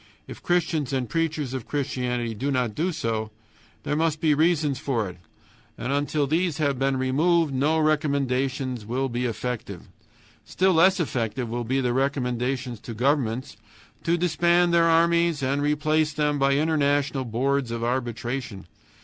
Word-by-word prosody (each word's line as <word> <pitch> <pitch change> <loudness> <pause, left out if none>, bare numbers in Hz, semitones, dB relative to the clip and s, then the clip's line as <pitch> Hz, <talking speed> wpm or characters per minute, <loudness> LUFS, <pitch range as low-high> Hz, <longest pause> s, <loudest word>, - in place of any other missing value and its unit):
If - - -10
Christians 165 -5 0
and 130 -2 -1
preachers 155 -4 -2
of 130 -4 -5
Christianity 125 -4 -2
do 135 +7 -3
not 125 -5 0
do 170 - -1
so, 110 -7 -2 0.5
there 145 - -1
must 160 0 0
be 155 -2 +3
reasons 150 -3 +2
for 120 -8 -1
it. 90 - -9 0.6
And 125 +4 -2
until 145 +1 0
these 160 +2 0
have 140 -4 0
been 135 0 +1
removed 150 +4 +2
no 145 +5 +2
recommendations 140 -5 0
will 130 +5 -2
be 120 +1 -2
effective. 115 -5 -4 0.6
Still 190 0 +1
less 185 +3 +4
effective 120 -5 -2
will 120 +1 -3
be 135 +3 0
the 125 -2 0
recommendations 125 -2 -1
to 115 +1 -8
governments 125 -1 0 0.5
to 170 +1 +1
disband 175 0 +2
their 170 -1 +5
armies 170 -2 +3
and 140 +2 0
replace 155 +1 +1
them 150 -1 0
by 135 0 +3
international 145 -2 +1
boards 130 +2 0
of 115 0 -4
arbitration. 120 -3 -3
140 Hz, 150 wpm, -25 LUFS, 125-155 Hz, 0.6 s, their